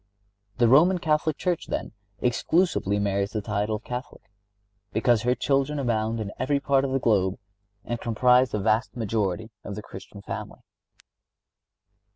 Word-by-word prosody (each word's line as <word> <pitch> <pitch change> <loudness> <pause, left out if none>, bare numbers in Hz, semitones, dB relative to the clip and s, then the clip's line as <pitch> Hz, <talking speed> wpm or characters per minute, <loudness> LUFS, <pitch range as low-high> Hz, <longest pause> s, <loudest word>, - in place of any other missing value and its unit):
The 120 -1 +4
Roman 165 +10 +6
Catholic 155 -2 0
Church, 180 -3 -1
then, - - -3 0.3
exclusively 125 - +1
merits 100 0 -1
the 105 - -1
title 105 +1 -1
of 105 - -7
Catholic, 125 0 -7 0.7
because 115 +1 +2
her 125 +1 +1
children 140 +3 0
abound 115 -4 0
in 105 -2 -4
every 140 +2 +1
part 135 -1 +2
of 140 - -1
the 135 - +2
globe 100 -7 +1 0.5
and 120 -1 -4
comprise 125 +2 +3
the - - -2
vast 110 +5 0
majority 110 -1 -2
of 100 - -6
the 105 - -7
Christian 100 +1 -11
family. - - -7
115 Hz, 150 wpm, -26 LUFS, 105-135 Hz, 0.7 s, Roman